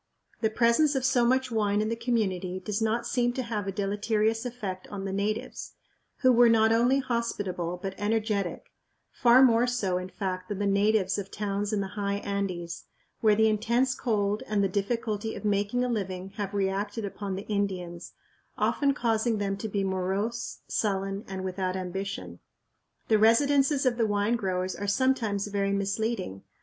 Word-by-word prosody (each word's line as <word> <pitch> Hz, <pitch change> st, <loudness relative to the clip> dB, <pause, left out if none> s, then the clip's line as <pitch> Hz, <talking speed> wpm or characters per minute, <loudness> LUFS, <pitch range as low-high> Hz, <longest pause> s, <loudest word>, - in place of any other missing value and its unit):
The 220 Hz, -, +2 dB
presence 235 Hz, +7 st, +3 dB
of 260 Hz, -1 st, 0 dB
so 250 Hz, -2 st, +3 dB
much 260 Hz, +1 st, +2 dB
wine 210 Hz, -2 st, +1 dB
in 215 Hz, +1 st, 0 dB
the 230 Hz, -, -1 dB
community 195 Hz, -6 st, -1 dB
does 210 Hz, +3 st, -3 dB
not 225 Hz, +2 st, 0 dB
seem 245 Hz, -1 st, +1 dB
to 255 Hz, -, -2 dB
have 215 Hz, -4 st, -3 dB
a -, -, 0 dB
deleterious 210 Hz, +4 st, 0 dB
effect 205 Hz, -7 st, -6 dB
on 195 Hz, -1 st, -6 dB
the 195 Hz, -, -3 dB
natives, 210 Hz, +3 st, -3 dB, 0.5 s
who 255 Hz, -1 st, +6 dB
were 240 Hz, -1 st, +6 dB
not 220 Hz, -1 st, +4 dB
only 240 Hz, +4 st, +4 dB
hospitable 205 Hz, -9 st, -2 dB
but 195 Hz, +1 st, -4 dB
energetic 210 Hz, -3 st, -1 dB, 0.4 s
far 250 Hz, +2 st, +6 dB
more 240 Hz, -1 st, +5 dB
so, 200 Hz, -7 st, 0 dB
in 185 Hz, 0 st, -6 dB
fact, 185 Hz, 0 st, -4 dB
than 205 Hz, -, -3 dB
the 205 Hz, -, -1 dB
natives 200 Hz, 0 st, +2 dB
of 195 Hz, -1 st, -6 dB
towns 205 Hz, 0 st, -2 dB
in 210 Hz, -2 st, 0 dB
the 195 Hz, -, -4 dB
high 200 Hz, -1 st, -1 dB
Andes, 195 Hz, -4 st, -3 dB, 0.3 s
where 215 Hz, -2 st, +4 dB
the 220 Hz, +1 st, +4 dB
intense 235 Hz, +4 st, +2 dB
cold 210 Hz, -4 st, 0 dB
and 210 Hz, -2 st, +1 dB
the -, -, +3 dB
difficulty 215 Hz, +2 st, -2 dB
of -, -, -7 dB
making 205 Hz, +4 st, +1 dB
a -, -, 0 dB
living 190 Hz, -5 st, -3 dB
have 200 Hz, 0 st, -5 dB
reacted 200 Hz, +2 st, -1 dB
upon 200 Hz, -1 st, -4 dB
the 195 Hz, -, -5 dB
Indians, 185 Hz, -4 st, -3 dB, 0.4 s
often 280 Hz, -1 st, +2 dB
causing 230 Hz, -2 st, +1 dB
them 200 Hz, -1 st, -1 dB
to 215 Hz, +2 st, -5 dB
be 200 Hz, -1 st, -1 dB
morose, 195 Hz, +5 st, -2 dB
sullen, 195 Hz, -1 st, -1 dB
and 190 Hz, -1 st, -5 dB
without 185 Hz, 0 st, -2 dB
ambition. 185 Hz, -, -5 dB, 0.7 s
The 215 Hz, -, +4 dB
residences 275 Hz, +5 st, +4 dB
of 245 Hz, -2 st, +2 dB
the 225 Hz, -2 st, +2 dB
wine 205 Hz, +2 st, +1 dB
growers 185 Hz, -4 st, -2 dB
are 205 Hz, -, -4 dB
sometimes 220 Hz, -3 st, +1 dB
very 200 Hz, -1 st, -1 dB
misleading. 200 Hz, -, -2 dB
205 Hz, 175 wpm, -28 LUFS, 195-230 Hz, 0.7 s, who